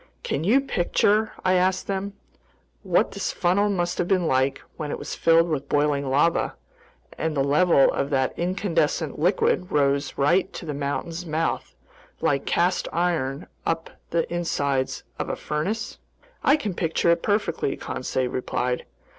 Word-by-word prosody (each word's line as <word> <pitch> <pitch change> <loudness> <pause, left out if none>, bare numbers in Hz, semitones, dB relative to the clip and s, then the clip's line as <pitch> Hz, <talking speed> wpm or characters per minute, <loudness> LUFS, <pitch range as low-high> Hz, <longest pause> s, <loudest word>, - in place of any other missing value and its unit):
"Can 145 - -2
you 235 +10 +4
picture," 215 -1 +1
I 185 - +4
asked 185 +1 +2
them, 195 0 -3 0.7
"what - - +2
this - - -2
funnel 195 +3 +2
must 175 -3 -1
have 175 - +1
been 185 -2 +2
like 130 -2 +1 0.2
when 150 -2 -4
it - - -3
was - - -6
filled 165 0 +4
with 150 -4 -3
boiling 145 -2 +1
lava, 150 +5 +2 0.6
and 160 -2 -1
the 135 - +3
level 145 +1 +4
of 140 - -1
that 130 -2 +1
incandescent 170 -4 -1
liquid 180 +1 +1
rose 140 -1 +1
right 170 +7 +2
to - - -7
the 150 - -3
mountain's 160 +5 -3
mouth, 160 +1 -2 0.4
like 140 -1 0
cast 180 +2 +1
iron 165 -5 -1 0.2
up 165 0 -2 0.2
the 165 0 0
insides 140 -6 -1 0.2
of - - -2
a - - -1
furnace?" 205 +10 -3 0.4
"I 280 - +5
can 210 -10 -3
picture 170 0 +1
it 170 - +2
perfectly," 205 -8 0
Conseil 130 0 -2
replied. 125 0 -2
165 Hz, 155 wpm, -24 LUFS, 140-185 Hz, 0.7 s, I